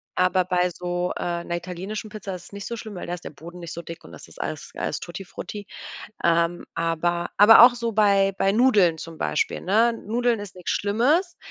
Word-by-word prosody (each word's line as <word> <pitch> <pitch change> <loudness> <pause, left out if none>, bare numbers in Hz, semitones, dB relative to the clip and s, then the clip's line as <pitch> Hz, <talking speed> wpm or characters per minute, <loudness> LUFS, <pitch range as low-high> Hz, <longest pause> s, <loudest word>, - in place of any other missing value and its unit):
Aber 185 0 +2
bei 180 -1 +1
so, 175 +1 -3
äh, 170 0 -3
'ner 170 - -3
italienischen 185 +5 -6
Pizza 205 -3 -6
ist 175 - -10
es - - -15
nicht 200 -1 -7
so 235 - -5
schlimm, 215 -1 -8
weil 180 - -7
da 175 - -2
ist 175 - -13
der - - -6
Boden 170 +4 -12
nicht 170 -2 -7
so 170 - -6
dick 165 0 -10
und - - -13
das - - -12
ist - - -16
alles 155 - -5
alles - - -3
Tuttifrutti. 195 +3 -8 0.6
Ähm, 170 +1 +2
aber 170 +1 -1
aber 210 +3 +9
auch 240 0 +8
so 235 -1 -3
bei 200 -2 +3
bei 195 - +3
Nudeln 205 -7 +4
zum 165 0 -9
Beispiel, - - -1
ne? 225 +5 +3
Nudeln 235 0 +1
ist 200 -3 -9
nix 180 - -5
Schlimmes. 285 - +1
185 Hz, 215 wpm, -24 LUFS, 175-215 Hz, 0.6 s, aber